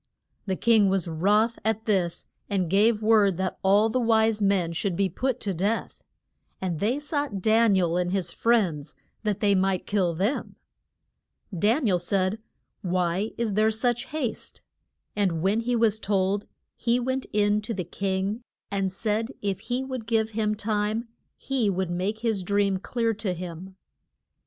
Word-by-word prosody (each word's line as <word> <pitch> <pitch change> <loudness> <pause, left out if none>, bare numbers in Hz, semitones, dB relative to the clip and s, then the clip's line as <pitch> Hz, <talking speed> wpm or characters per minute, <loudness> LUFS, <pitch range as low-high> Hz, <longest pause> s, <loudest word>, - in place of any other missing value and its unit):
The 190 - 0
king 220 -1 +4
was 190 -3 0
wroth 205 +8 +2
at 220 0 -1
this 185 -6 0 0.2
and 185 -5 -1
gave 215 +2 +3
word 210 -4 +4
that 190 0 -2
all 200 +3 +4
the 255 +3 0
wise 220 -2 +2
men 195 -4 +2
should 180 +2 -1
be 195 +1 +1
put 255 +7 -2
to 200 -3 -2
death. 200 +6 -2 0.6
And 175 -4 -3
they 230 +6 +1
sought 290 -7 -2
Dan 220 +1 +4
i - - +3
el 170 0 +1
and 180 0 0
his 185 -3 -1
friends, 170 -12 0 0.3
that 210 -3 -2
they 205 -2 +4
might 190 -1 +1
kill 185 -5 0
them. 205 - -1 1.0
Dan 225 - +2
i 210 - +3
el 180 - +2
said, 185 +3 0 0.4
Why 180 +2 0
is 230 -3 -1
there 215 +2 +3
such 235 +2 -1
haste? 290 -7 -5 0.5
And 180 -6 0
when 200 +4 +2
he 240 +1 0
was 220 -2 +2
told 200 -1 0 0.3
he 240 +1 +1
went 260 +1 -2
in 210 0 +2
to 215 - -6
the 185 - -2
king 195 +5 -2 0.3
and 195 -1 0
said 215 +3 -1 0.2
if 200 -2 -1
he 250 +2 0
would 255 -4 -6
give 225 -1 +1
him 215 -1 0
time 215 +2 -1 0.3
he 260 -6 0
would 190 -2 -1
make 195 +5 -2
his 225 -4 0
dream 200 +1 +1
clear 230 +2 -1
to 205 -4 -3
him. 180 +2 -8
205 Hz, 170 wpm, -26 LUFS, 190-225 Hz, 1.0 s, king